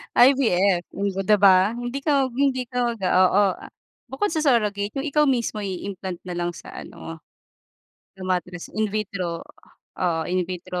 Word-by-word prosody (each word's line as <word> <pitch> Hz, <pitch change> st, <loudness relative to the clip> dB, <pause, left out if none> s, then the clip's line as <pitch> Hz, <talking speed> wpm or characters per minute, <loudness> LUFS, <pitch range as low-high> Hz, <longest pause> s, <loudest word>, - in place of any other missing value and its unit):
IVF, 200 Hz, -9 st, +4 dB
hmm, 200 Hz, +1 st, -1 dB
'di 210 Hz, +1 st, +5 dB
ba? 195 Hz, +2 st, +5 dB
Hindi 245 Hz, +3 st, -4 dB
ka 275 Hz, -2 st, +1 dB
hindi 260 Hz, 0 st, +1 dB
ka 250 Hz, -, -6 dB, 0.2 s
mag -, -, -17 dB
oo, 185 Hz, +2 st, +4 dB, 0.2 s
ah, -, -, -12 dB, 0.4 s
bukod 340 Hz, +10 st, -1 dB
sa 320 Hz, -, 0 dB
surrogate 210 Hz, -6 st, +1 dB
'yong 275 Hz, +3 st, -2 dB
ikaw 300 Hz, +1 st, +3 dB
mismo 235 Hz, -5 st, 0 dB
i-implant 190 Hz, -2 st, -5 dB
na 180 Hz, -1 st, -6 dB
lang 175 Hz, 0 st, -1 dB
sa -, -, -11 dB
ano, 165 Hz, 0 st, -9 dB, 1.0 s
sa 190 Hz, -, -17 dB
matres. 180 Hz, -1 st, -3 dB
In 215 Hz, 0 st, 0 dB
vitro, 190 Hz, -5 st, -3 dB, 0.5 s
oo, 170 Hz, -3 st, 0 dB
in 180 Hz, +1 st, 0 dB
vitro, 180 Hz, 0 st, -5 dB
200 Hz, 160 wpm, -23 LUFS, 180-250 Hz, 1.0 s, di